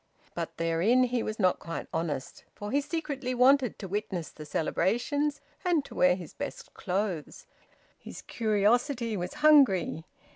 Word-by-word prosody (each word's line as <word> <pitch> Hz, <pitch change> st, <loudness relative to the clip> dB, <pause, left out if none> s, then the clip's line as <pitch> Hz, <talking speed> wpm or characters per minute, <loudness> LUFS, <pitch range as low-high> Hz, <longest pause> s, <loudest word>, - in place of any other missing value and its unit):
But -, -, -5 dB
therein 170 Hz, +10 st, +3 dB
he 245 Hz, -1 st, 0 dB
was 215 Hz, 0 st, -4 dB
not 185 Hz, -4 st, +2 dB
quite 165 Hz, 0 st, -5 dB
honest. 160 Hz, -5 st, -3 dB
For 205 Hz, 0 st, -6 dB
he 285 Hz, +2 st, +2 dB
secretly 280 Hz, -5 st, -3 dB
wanted 255 Hz, 0 st, +4 dB
to 195 Hz, -, -7 dB
witness 190 Hz, -4 st, -3 dB
the 155 Hz, -1 st, -11 dB
celebrations 280 Hz, -, 0 dB, 0.2 s
and 340 Hz, -6 st, +1 dB
to -, -, -11 dB
wear 180 Hz, 0 st, +4 dB
his 180 Hz, -4 st, -9 dB
best -, -, -7 dB
clothes. 185 Hz, -4 st, -3 dB, 0.5 s
His -, -, -10 dB
curiosity 230 Hz, +2 st, +1 dB
was 180 Hz, +9 st, -4 dB
hungry. 215 Hz, -, +5 dB
215 Hz, 145 wpm, -29 LUFS, 180-265 Hz, 0.5 s, hungry